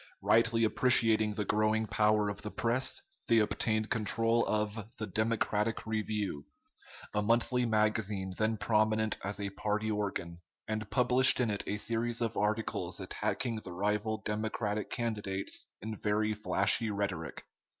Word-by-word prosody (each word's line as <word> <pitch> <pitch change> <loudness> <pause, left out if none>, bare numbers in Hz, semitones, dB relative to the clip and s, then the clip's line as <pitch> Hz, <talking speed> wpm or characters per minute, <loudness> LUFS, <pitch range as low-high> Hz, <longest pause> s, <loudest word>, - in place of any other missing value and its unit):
Rightly 115 0 +3
appreciating 110 -2 +3
the 105 - -2
growing 110 +2 +1
power 105 -1 +2
of 100 0 -4
the 105 - -5
press, 120 +4 +1 0.2
they 115 - +4
obtained 110 0 +1
control 115 +1 +2
of 105 0 -2
the 110 - -3
"Democratic 110 +1 0
Review," 105 -8 -3 0.7
a 105 - +1
monthly 120 +3 +2
magazine 105 -3 0
then 110 +2 0
prominent 110 0 +2
as 100 +1 -3
a 100 -1 -3
party 105 +2 -1
organ, 100 -5 -3 0.3
and 110 -1 -3
published 125 +1 +4
in 120 -4 +1
it 100 - -1
a 105 - -1
series 115 +2 -1
of 115 -1 -1
articles 110 +2 -1
attacking 115 -2 -2
the 95 -5 -8
rival 105 +3 -1
Democratic 105 -1 -2
candidates 105 -5 -3 0.2
in 110 0 -4
very 110 +1 +1
flashy 105 +2 +1
rhetoric. 100 -6 -3
110 Hz, 140 wpm, -31 LUFS, 105-115 Hz, 0.7 s, they